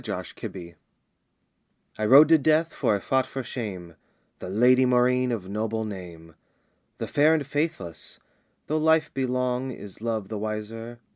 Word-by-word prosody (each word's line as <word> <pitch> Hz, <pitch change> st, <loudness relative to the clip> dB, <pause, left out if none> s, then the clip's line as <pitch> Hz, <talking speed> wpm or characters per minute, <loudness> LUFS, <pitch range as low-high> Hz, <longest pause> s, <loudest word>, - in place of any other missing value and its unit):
ROMAUNT -, -, -5 dB
OF -, -, -3 dB
THE 85 Hz, -3 st, -8 dB
OAK -, -, -26 dB, 1.2 s
"I 110 Hz, -, 0 dB
rode 145 Hz, +6 st, +8 dB
to 160 Hz, -1 st, +6 dB
death, 155 Hz, +3 st, +2 dB
for 105 Hz, -, +1 dB
I -, -, -2 dB
fought 130 Hz, +6 st, 0 dB
for 135 Hz, -, -5 dB
shame 95 Hz, -, -6 dB, 0.4 s
The -, -, -7 dB
Lady 125 Hz, +6 st, +4 dB
Maurine 125 Hz, 0 st, +2 dB
of 105 Hz, -6 st, -4 dB
noble 110 Hz, +2 st, -2 dB
name, 85 Hz, -5 st, -9 dB, 0.6 s
"The -, -, -3 dB
fair 155 Hz, +2 st, +4 dB
and 150 Hz, -3 st, -2 dB
faithless! 145 Hz, -, -4 dB, 0.5 s
Though 155 Hz, -, -1 dB
life 160 Hz, 0 st, +2 dB
be 135 Hz, -1 st, -1 dB
long 125 Hz, +1 st, -1 dB
Is 105 Hz, -5 st, -9 dB
love 110 Hz, -4 st, -3 dB
the 110 Hz, -2 st, -4 dB
wiser? 110 Hz, +2 st, -5 dB
120 Hz, 165 wpm, -25 LUFS, 105-135 Hz, 1.2 s, rode